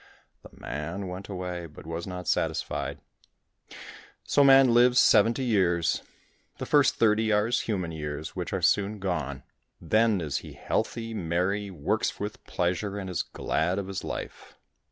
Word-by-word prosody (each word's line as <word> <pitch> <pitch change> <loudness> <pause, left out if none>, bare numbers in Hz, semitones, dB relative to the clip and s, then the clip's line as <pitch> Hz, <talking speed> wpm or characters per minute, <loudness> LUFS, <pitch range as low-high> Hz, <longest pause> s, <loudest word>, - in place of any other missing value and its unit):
The - - -13
man 85 +8 -5
went 90 +2 -7
away, 90 -3 -5
but 75 - -14
was 85 +2 -5
not 90 -1 -6
satisfied. - - -1 1.3
So 145 - +3
man 135 -2 +7
lives 125 +1 +5
seventy 115 +5 +4
years. 90 -8 +2 0.6
The - - -5
first 145 -3 +4
thirty 110 0 +3
are 105 0 +3
his 120 +3 +1
human 95 -6 -2
years, 75 -1 -5
which - - -4
are - - -2
soon 100 +2 +2
gone; 75 -8 -3 0.4
then 110 -2 +2
is 75 -5 -2
he - - -8
healthy, 115 -1 -2
merry, 95 +2 -1
works 85 -7 -1
with - - -5
pleasure, 90 +3 -1
and 95 -2 -5
is 90 - 0
glad 90 +4 -1
of 100 - -2
his 95 -1 -5
life. - - -7
95 Hz, 155 wpm, -27 LUFS, 85-110 Hz, 1.3 s, man